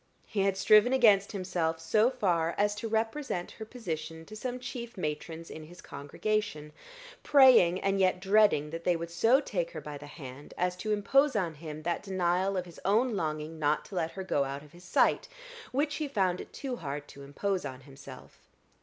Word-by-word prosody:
He 215 - -4
had 195 0 +2
striven 215 +5 +5
against 210 -6 +5
himself 180 -4 -2
so 210 +9 +3
far 175 -10 0
as 205 0 +2
to 210 +2 -5
represent 225 -3 -2
her 220 - -8
position 165 -8 -6
to 215 - -11
some 250 +3 -4
chief 245 -2 -7
matrons 160 0 -5
in 155 - -8
his 175 +3 -14
congregation, 150 +2 -3 0.5
praying 255 -11 +6
and 195 0 +1
yet 185 -1 +3
dreading 195 -6 +3
that 165 +1 -6
they 175 0 +2
would 170 0 -5
so 225 +10 +4
take 180 -11 -2
her 160 - -5
by 150 -1 -8
the 145 - -10
hand 145 -2 -10
as 180 0 0
to 215 +4 -3
impose 265 +7 +3
on 180 -6 0
him 155 0 -8
that 170 +1 -1
denial 185 0 0
of 180 - -2
his 170 -2 -13
own 220 +4 +2
longing 155 -2 -3
not 150 0 +1
to 195 - -10
let 165 -2 -1
her 190 - -5
go 145 -6 +1
out 140 +1 -5
of 150 - -17
his 175 +1 -16
sight, - - +2 0.4
which 285 +3 0
he 305 - -2
found 190 -9 0
it - - -12
too 260 -3 -5
hard 145 -3 -5
to 140 - -12
impose 185 +7 -2
on 130 -2 -7
himself. 135 -1 -13
180 Hz, 200 wpm, -30 LUFS, 155-215 Hz, 0.5 s, praying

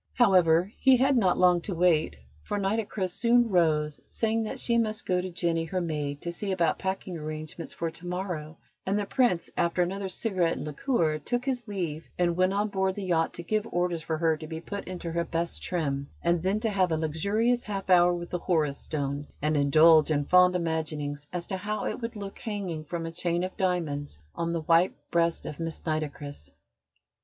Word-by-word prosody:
However, 185 -4 +4
he 265 -1 +6
had 270 +2 +3
not 190 -7 +3
long 180 -1 +4
to 190 +1 -4
wait, 165 - +3 0.3
for 80 - -3
Nitocris 200 -2 -1
soon 235 +3 +3
rose, 155 -5 +2
saying 225 0 0
that - - -5
she 235 -1 +2
must 215 -1 -1
go 180 -1 +1
to 185 - -4
Jenny, 170 -1 0
her 185 +3 -2
maid, 150 -4 -3
to 170 - -3
see 195 +3 -3
about 175 -4 +1
packing 190 -2 -3
arrangements 155 +2 -6
for 165 -1 -3
to 170 +2 -10
morrow; 175 -4 -4 0.3
and 195 +2 0
the 205 - -1
Prince, 220 -6 +1
after 170 +1 +2
another 195 +2 -3
cigarette 185 -4 0
and - - -5
liqueur, 155 - 0
took 245 - -2
his 250 -4 -2
leave 170 -6 -4
and 175 -1 +2
went 185 +1 +3
on 205 +2 0
board 190 -1 0
the 205 - -5
yacht 165 -3 +1
to 175 - -6
give 215 +4 -1
orders 175 -1 0
for 160 0 -2
her 160 0 +2
to 155 - -8
be 160 0 -5
put 200 +4 -6
into 180 -2 -5
her 170 +1 0
best 170 0 -2
trim, 140 -6 -2
and 170 0 +2
then 190 +4 +1
to 225 -2 0
have 185 -3 +2
a 160 - +2
luxurious 200 +10 +1
half 200 -2 -4
hour 180 -1 +6
with 175 0 -4
the 180 - -1
Horus 155 -6 0
Stone, 145 -1 -3
and 150 +1 0
indulge 155 +2 +6
in 145 -2 +1
fond 180 +2 +5
imaginings 155 -4 -2
as 175 -1 -3
to 190 - -3
how 210 +3 -3
it - - -3
would 230 0 -4
look 200 -1 -7
hanging 190 -8 -4
from 165 +1 -4
a 165 - -4
chain 175 +1 -1
of 185 - -4
diamonds 155 - -2
on 170 0 -2
the 170 -1 -1
white 165 +3 +3 0.2
breast 170 0 +1
of 150 - -6
Miss 165 -1 -3
Nitocris. 145 - -4
175 Hz, 205 wpm, -28 LUFS, 160-195 Hz, 0.3 s, he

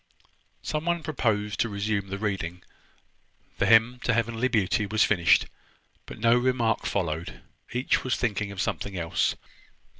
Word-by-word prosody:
Some 155 +1 -3
one 170 -1 0
proposed 110 -9 -1
to 115 - +1
resume 100 0 -2
the 100 +1 -4
reading. 95 -4 -3 1.0
The - - +2
`Hymn 115 +2 +4
to 125 - +1
Heavenly 115 +1 0
Beauty' 105 -3 +1
was 110 +2 +2
finished, 85 -5 +4 0.6
but - - -9
no 115 +1 +4
remark 120 -3 +1
followed. 85 -4 -3 0.3
Each 125 +2 0
was 130 -4 0
thinking 105 -3 -2
of 100 - -8
something 95 +1 -2
else. 85 -1 0
110 Hz, 145 wpm, -26 LUFS, 100-120 Hz, 1.0 s, `Hymn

